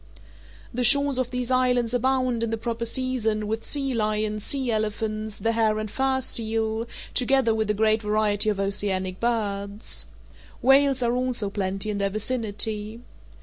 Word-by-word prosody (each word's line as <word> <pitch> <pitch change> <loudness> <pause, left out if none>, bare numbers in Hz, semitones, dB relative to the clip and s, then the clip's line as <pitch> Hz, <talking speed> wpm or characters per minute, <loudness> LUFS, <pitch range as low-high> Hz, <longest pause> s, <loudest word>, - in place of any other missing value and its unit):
The 250 +1 -1
shores 280 +1 +6
of 255 -1 -1
these 250 0 -3
islands 250 -2 +2
abound, 255 -1 +1
in 230 - -1
the 225 - -2
proper 235 +1 -3
season, 230 -3 0
with 220 +2 -3
sea 275 -2 0
lions, 215 -1 -1
sea 265 -1 -1
elephants, 215 0 -2
the 225 - 0
hair 220 -2 +1
and 215 -1 -4
fur 265 0 +1
seal, 225 -1 -1 0.3
together 255 -2 +3
with 220 -1 -1
a 210 - +1
great 220 +1 +2
variety 210 0 +1
of 205 -2 -1
oceanic 190 -2 -1
birds. 205 -3 -2 0.5
Whales 270 0 +4
are 240 0 +1
also 250 -5 -1
plenty 195 +1 -1
in 205 - -3
their 200 0 +1
vicinity. 215 0 -3
225 Hz, 155 wpm, -25 LUFS, 210-250 Hz, 0.5 s, shores